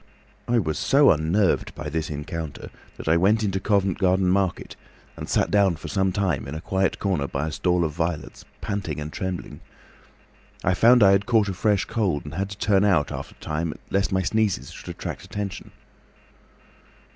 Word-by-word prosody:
I 120 - +2
was 80 -8 -1
so 140 +1 +5
unnerved 85 +5 +1
by 75 - -6
this 80 +1 -2
encounter 75 +1 -6 0.3
that - - -9
I 80 +2 +4
went 105 +5 +3
into 95 -2 0
Covent 100 -2 +1
Garden 95 -1 +2
Market 95 -1 0 0.4
and - - -7
sat - - +1
down 100 -4 +3
for - - -8
some 95 -1 +1
time 90 -9 -1
in 70 - -6
a - - -4
quiet 95 +2 0
corner 90 -9 -1
by 70 +2 -2
a 80 - -3
stall 90 +1 +1
of 80 - -2
violets, 80 -2 -4 0.2
panting 90 -7 -3
and 75 +1 -6
trembling. 95 -2 -5 1.0
I 90 - +2
found 120 +4 +6
I 95 - +7
had 100 +2 +2
caught 110 -4 +3
a - - -2
fresh 100 +1 +1
cold, 95 -11 -1
and 75 - -8
had 95 +4 -2
to 100 - -8
turn 100 -2 +2
out 90 -8 +2
after - - -7
a - - -14
time 80 +1 -2 0.2
lest 100 0 +1
my 95 0 +1
sneezes 110 0 0
should - - -10
attract - - -6
attention. 100 -2 -6
95 Hz, 190 wpm, -24 LUFS, 80-100 Hz, 1.0 s, I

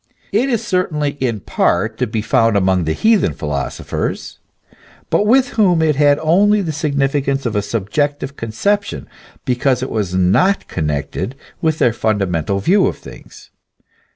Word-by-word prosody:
It 235 +7 +1
is 235 -4 -1
certainly 155 -6 0
in 115 -6 -1
part 110 +6 0
to 125 - 0
be 110 -1 -3
found 115 -1 +2
among 95 -3 +1
the 80 - 0
heathen 215 - +2
philosophers; 70 -2 -4 0.7
but 210 - +2
with 255 +2 +3
them 185 -6 +4
it 155 -2 +2
had 145 0 +4
only 200 +6 +3
the 165 - -2
significance 140 -2 -1
of 115 -3 -2
a 105 - +2
subjective 135 +8 -2
conception, 200 - -2 0.4
because 125 -1 +1
it 130 - -4
was 100 -5 -2
not 95 - +2
connected 75 - -3 0.3
with 160 -2 +1
their 120 - +2
fundamental 100 -6 -1
view 185 - +3
of - - -3
things. - - -14
135 Hz, 150 wpm, -17 LUFS, 100-165 Hz, 0.7 s, them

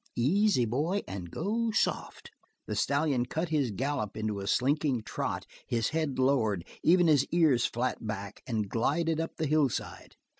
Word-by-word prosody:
Easy, 170 - +3
boy, 155 - 0
and 95 -3 -6
go 225 - -1
soft!" 220 - -1 0.3
The 105 - -3
stallion 140 +1 +1
cut 160 +5 -2
his 145 -5 +1
gallop 120 -1 -2
into 110 -2 -2
a 100 - -5
slinking 135 0 +1
trot, - - -3 0.2
his 115 -2 0
head 155 -4 -1
lowered, 115 -9 +2 0.2
even 175 +1 +5
his 150 -4 +5
ears 155 -8 +3
flat 125 +1 -2
back, 100 -2 -5
and 110 -5 -1
glided 155 - 0
up 165 - -3
the 160 - -1
hillside. 150 -4 -1
135 Hz, 155 wpm, -29 LUFS, 115-160 Hz, 0.3 s, even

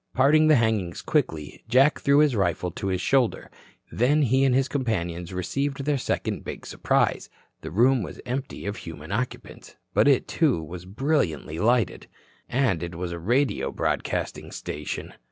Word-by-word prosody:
Parting 150 +4 +5
the 155 - +6
hangings 110 -7 0
quickly, 75 -2 -1
Jack 135 +5 +4
threw 140 0 +3
his 150 -5 +3
rifle 90 -2 0
to 95 - -5
his 95 -1 0
shoulder. 125 +5 +1 0.4
Then 145 +6 +3
he 130 +1 +3
and 130 -2 +3
his 135 0 +2
companions 90 - -2
received 135 - -2
their 145 -2 +1
second - - -2
big - - -7
surprise. - - 0 0.3
The - - -6
room 120 - +3
was 90 - -7
empty 130 -1 -4
of 100 +2 -3
human 80 0 -9
occupants. 125 +5 -5 0.2
But - - +4
it, - - +3
too, - - +2
was 90 +3 -8
brilliantly 95 - -1
lighted. 115 0 +1 0.4
And 120 -10 +1
it 85 0 -5
was 85 0 -4
a 85 - -5
radio 120 - +1
broadcasting - - -2
station. 75 0 -5
115 Hz, 160 wpm, -25 LUFS, 90-135 Hz, 0.4 s, the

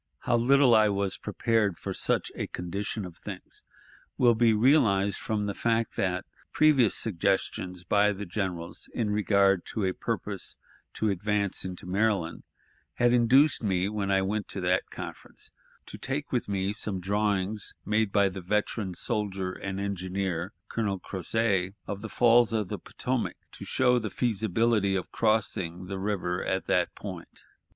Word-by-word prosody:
How 120 - +1
little 130 +2 +5
I 110 -1 +6
was 100 -1 -1
prepared 110 -6 0
for - - -5
such - - 0
a - - -4
condition 100 +4 -4
of 90 -2 -10
things 95 -3 -9 0.5
will 120 -2 +5
be 115 0 +4
realized 110 -5 +3
from 105 -1 -2
the 100 - -2
fact 115 +1 0
that 90 0 -1 0.3
previous 140 -8 +4
suggestions 90 -2 -1
by 105 +3 +3
the 100 0 -5
generals 90 -3 -4
in 110 -3 0
regard 100 -3 +3
to 105 - -2
a 95 - 0
purpose - - -3 0.4
to 110 - 0
advance 100 +1 -1
into 90 -1 -6
Maryland 95 -3 0 0.5
had 120 0 +3
induced 130 +5 +4
me, 95 -4 +1
when 105 -2 -2
I 95 -1 +3
went 105 +2 -2
to 95 - -4
that 90 0 +1
conference, - - -8 0.3
to - - -10
take 140 +2 -3
with 125 -4 -1
me 100 0 0
some 105 -3 -3
drawings 100 +1 -1
made 105 -1 +1
by 100 -1 +4
the 95 0 -5
veteran 100 0 -1
soldier 100 -3 -2
and 95 +1 -5
engineer, 95 -2 -2 0.2
Colonel 100 -4 -2
Crozêt, 95 0 -1
of 100 0 -5
the 110 - -6
falls 120 0 +4
of 105 -4 -1
the - - -4
Potomac, - - -3
to - - -9
show 125 -1 +3
the 110 -2 -4
feasibility 110 -2 +1
of 95 - -3
crossing 95 -5 0
the 95 +1 -5
river 95 -3 -1
at 95 0 -1
that 90 -1 +1
point. 90 -5 -9
100 Hz, 160 wpm, -28 LUFS, 95-110 Hz, 0.5 s, I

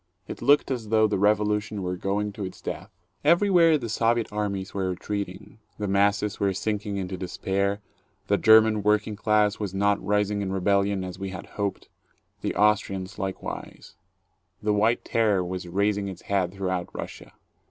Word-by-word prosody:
It - - -7
looked 140 +3 +4
as 115 -5 -3
though 110 0 +4
the 105 -3 0
Revolution 105 0 +1
were 90 0 -2
going 100 +3 -1
to 100 - -6
its 95 - -7
death. 95 +4 -6 0.3
Everywhere 170 0 +5
the 120 -5 -5
Soviet 115 0 0
armies 100 -2 -3
were 95 -2 -1
retreating, 100 +2 -5 0.2
the 105 - -3
masses 100 +1 +1
were 100 -1 +1
sinking 105 -1 -2
into 95 -1 -4
despair, 100 +2 -2 0.4
the - - +1
German 110 -1 +6
working 105 +1 +1
class 105 0 +2
was 100 -3 -4
not 100 +1 +1
rising 105 +1 +1
in 95 -1 -2
rebellion 100 0 +1
as 90 0 -7
we 95 0 -4
had 90 -2 -7
hoped, 100 -1 -3 0.5
the - - -2
Austrians 100 -1 +1
likewise; 95 -1 -6 0.7
the 105 0 0
White 110 +3 +2
Terror 105 -5 +2
was 90 0 -5
raising 100 +2 0
its 95 -2 -8
head 95 -3 0
through 95 -1 -3
out 90 -1 -2
Russia. - - -8
100 Hz, 165 wpm, -26 LUFS, 95-105 Hz, 0.7 s, German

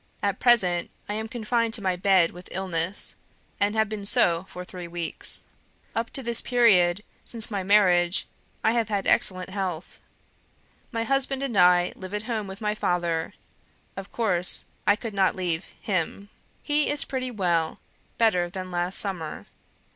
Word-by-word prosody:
At 200 0 0
present 185 -8 +3 0.2
I 205 - -3
am 220 +1 -3
confined 230 -1 0
to 220 - -1
my 185 -1 +1
bed 185 -2 +4
with 180 +1 -12
illness, 185 0 -2 0.5
and 205 +1 +1
have 220 0 +3
been 210 -1 -5
so 175 -2 +3
for 180 0 -8
three 180 -1 -8
weeks. 170 -1 -1 0.5
Up 230 +1 -1
to 270 - -3
this 235 -1 +3
period, 205 -7 +4 0.2
since 230 -1 +1
my 200 -2 -1
marriage, 185 -3 +3 0.4
I - - +4
have 230 -2 0
had 200 -2 -1
excellent 185 -1 +2
health. 185 -4 -4 0.9
My 230 -2 -1
husband 270 +2 0
and 255 -5 -3
I 180 -1 +5
live 185 +2 -6
at 210 - -3
home 220 -3 -3
with 190 +2 -9
my 210 -1 0
father; 170 -5 -1 0.6
of 195 0 -8
course, 180 -6 0 0.2
I 205 - +6
could 225 0 -6
not 190 -2 +2
leave 175 -2 -2
HIM. 200 +1 -2 0.3
He 295 0 +1
is 290 0 +1
pretty 255 -1 -3
well, 175 -8 0 0.4
better 180 -6 +3
than 185 0 -6
last 175 +1 -1
summer. 180 -6 -3
195 Hz, 160 wpm, -26 LUFS, 180-220 Hz, 0.9 s, I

